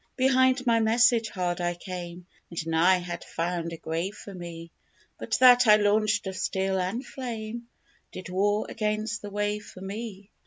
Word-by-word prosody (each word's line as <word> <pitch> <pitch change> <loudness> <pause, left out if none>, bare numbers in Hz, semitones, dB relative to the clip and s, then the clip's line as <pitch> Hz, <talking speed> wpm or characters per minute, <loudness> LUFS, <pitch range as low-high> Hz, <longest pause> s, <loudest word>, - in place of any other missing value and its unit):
Behind 260 0 +3
my 230 -1 +4
message 225 +1 +3
hard 180 -2 -2
I 175 0 -1
came, 175 -1 -7 0.2
And 170 -2 -5
nigh 165 +3 +4
had 175 -1 -6
found 170 0 -3
a 165 - -6
grave 165 +6 -3
for 200 - -10
me; 170 -2 -8 0.5
But - - -1
that 250 -1 +8
I 210 - +9
launched 210 +1 +2
of 190 -1 -4
steel 190 0 -1
and 195 +8 -2
flame 235 -2 -6 0.4
Did 185 - -8
war 205 +3 +1
against 215 -1 -2
the 205 - -7
wave 205 +1 -2
for 185 - -12
me. 200 0 -7
205 Hz, 165 wpm, -27 LUFS, 180-225 Hz, 0.5 s, I